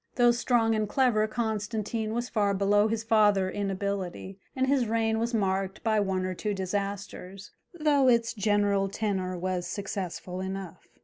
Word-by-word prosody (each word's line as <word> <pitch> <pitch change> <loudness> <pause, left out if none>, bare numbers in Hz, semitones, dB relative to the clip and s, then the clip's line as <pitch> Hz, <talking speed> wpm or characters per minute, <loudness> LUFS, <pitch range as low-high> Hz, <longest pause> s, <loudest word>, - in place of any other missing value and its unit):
Though 240 -1 +5
strong 235 -1 +2
and 215 -1 0
clever, 225 -4 +2
Constantine 220 0 -2
was 240 +1 -1
far 205 -4 +1
below 205 +2 +3
his 225 0 -2
father 210 -4 +3
in 200 -1 -2
ability, 195 -1 -4 0.2
and 260 0 +1
his 265 -3 +2
reign 225 0 +1
was 230 +1 -1
marked 195 -3 -1
by 220 -2 +2
one 190 -2 0
or 185 - -2
two 205 +3 -3
disasters, 195 0 -4 0.3
though 290 -3 +3
its 235 -2 +3
general 205 -2 +1
tenor 190 -3 -2
was 180 0 -2
successful 185 -2 -5
enough. 190 -2 -6
205 Hz, 160 wpm, -28 LUFS, 195-225 Hz, 0.3 s, Though